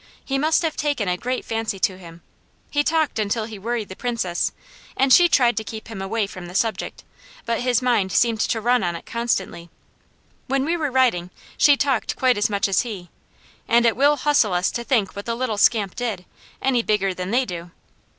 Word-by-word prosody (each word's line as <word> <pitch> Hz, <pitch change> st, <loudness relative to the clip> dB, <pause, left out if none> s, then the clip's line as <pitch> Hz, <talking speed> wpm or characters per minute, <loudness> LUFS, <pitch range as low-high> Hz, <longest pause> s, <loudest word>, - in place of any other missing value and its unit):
He 270 Hz, 0 st, -1 dB
must 315 Hz, +3 st, +2 dB
have 315 Hz, -2 st, -1 dB
taken 290 Hz, -9 st, -1 dB
a 180 Hz, -, +1 dB
great 250 Hz, +7 st, -3 dB
fancy 225 Hz, -3 st, -2 dB
to 185 Hz, 0 st, 0 dB
him. 170 Hz, -2 st, -13 dB, 0.5 s
He 290 Hz, 0 st, +2 dB
talked 315 Hz, -6 st, 0 dB
until 215 Hz, +1 st, -1 dB
he 215 Hz, -2 st, -9 dB
worried 225 Hz, 0 st, -3 dB
the 190 Hz, -, -9 dB
Princess, 230 Hz, -8 st, -1 dB, 0.5 s
and 265 Hz, 0 st, +4 dB
she 350 Hz, -1 st, +7 dB
tried 245 Hz, -7 st, +4 dB
to 220 Hz, -, -1 dB
keep 220 Hz, +2 st, -8 dB
him 210 Hz, -4 st, -6 dB
away 205 Hz, +3 st, -1 dB
from 185 Hz, -3 st, -9 dB
the 180 Hz, -, -10 dB
subject, 220 Hz, -2 st, -2 dB, 0.4 s
but 230 Hz, 0 st, -1 dB
his 250 Hz, 0 st, +1 dB
mind 220 Hz, -7 st, +1 dB
seemed 225 Hz, +4 st, +2 dB
to 225 Hz, -, 0 dB
run 245 Hz, +2 st, +2 dB
on 175 Hz, -2 st, -1 dB
it 170 Hz, -, -9 dB
constantly. 190 Hz, -7 st, -2 dB, 0.8 s
When 270 Hz, 0 st, 0 dB
we 335 Hz, +3 st, 0 dB
were 310 Hz, -4 st, -1 dB
riding 245 Hz, -10 st, +2 dB, 0.3 s
she 290 Hz, -2 st, +5 dB
talked 270 Hz, -5 st, 0 dB
quite 255 Hz, -1 st, +3 dB
as 210 Hz, +2 st, +2 dB
much 200 Hz, -1 st, 0 dB
as 195 Hz, -2 st, +2 dB
he, 200 Hz, -8 st, -7 dB, 0.6 s
and 235 Hz, 0 st, +4 dB
it 230 Hz, -, +3 dB
will 285 Hz, +3 st, +4 dB
hustle 270 Hz, -9 st, +2 dB
us 180 Hz, +1 st, +1 dB
to 235 Hz, -, -4 dB
think 230 Hz, -6 st, 0 dB
what 200 Hz, +2 st, -7 dB
the 230 Hz, -, -1 dB
little 230 Hz, -4 st, -2 dB
scamp 210 Hz, -4 st, +3 dB
did, 225 Hz, -7 st, -3 dB, 0.4 s
any 260 Hz, -3 st, +2 dB
bigger 205 Hz, -4 st, 0 dB
than 180 Hz, 0 st, -5 dB
they 250 Hz, +4 st, +2 dB
do. 175 Hz, -3 st, -7 dB
230 Hz, 210 wpm, -22 LUFS, 195-255 Hz, 0.8 s, she